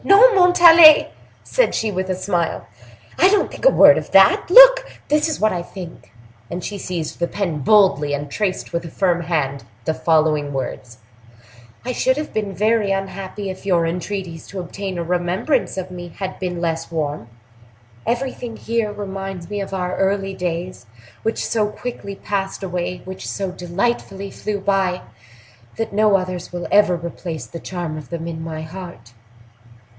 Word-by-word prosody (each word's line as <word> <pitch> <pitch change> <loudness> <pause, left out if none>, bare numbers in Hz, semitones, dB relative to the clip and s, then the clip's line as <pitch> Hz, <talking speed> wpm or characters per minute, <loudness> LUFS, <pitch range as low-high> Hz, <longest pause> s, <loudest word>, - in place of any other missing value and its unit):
"No, 440 +5 +7
Montalais," 345 -4 +7 0.3
said - - +1
she, 220 -1 -1
with 190 0 -3
a 185 - 0
smile; 180 -3 -2 0.5
"I 375 - +6
don't 410 0 +1
think - - -7
a - - +9
word - - +7
of - - -10
that. - - +5
Look, - - +8 0.2
this 300 +2 +2
is 310 - -3
what 215 -1 +2
I 175 - -2
think;" 175 -1 -10 0.4
and 175 +1 -5
she 205 -1 -5
seized 175 -4 -5
the 170 - 0
pen 175 -7 -3
boldly, 150 -4 +3
and 145 0 -6
traced, 185 +2 -3
with 170 0 -1
a 165 - -8
firm 175 0 0
hand, 150 -6 -2 0.2
the 160 - 0
following 155 -3 +1
words: 125 -3 -5 0.9
"I 250 - -2
should 260 +2 +1
have 300 - -5
been 205 -3 -3
very 215 +1 +1
unhappy 195 +1 -4
if 185 - -11
your 175 -4 +2
entreaties 175 -1 -5
to 195 - -7
obtain 185 +1 -5
a 170 - -2
remembrance 180 - -1
of 185 -1 -5
me 175 -1 -7
had 185 +2 -6
been 180 -2 -3
less 165 -1 -2
warm. 150 -6 -3 0.8
Everything 245 -2 -3
here 230 -2 -2
reminds 195 -3 -6
me 205 -1 -2
of 195 - -6
our 185 -1 -2
early 195 0 0
days, 175 -6 -5 0.3
which 225 - -2
so 215 -2 0
quickly 210 -2 -7
passed 195 -1 -4
away, 180 -1 -4
which 190 0 -8
so 195 -2 -3
delightfully 195 +2 -3
flew 210 -1 -4
by, 195 -2 0 0.8
that 225 -2 -3
no 210 0 +4
others 185 -2 -5
will 175 -1 -5
ever 205 -3 +4
replace 170 -1 -6
the 170 - -9
charm 170 -4 -5
of 145 - -13
them 165 -1 -5
in 160 -1 -5
my 160 -1 -6
heart." 160 -9 -10
185 Hz, 170 wpm, -20 LUFS, 170-210 Hz, 0.9 s, a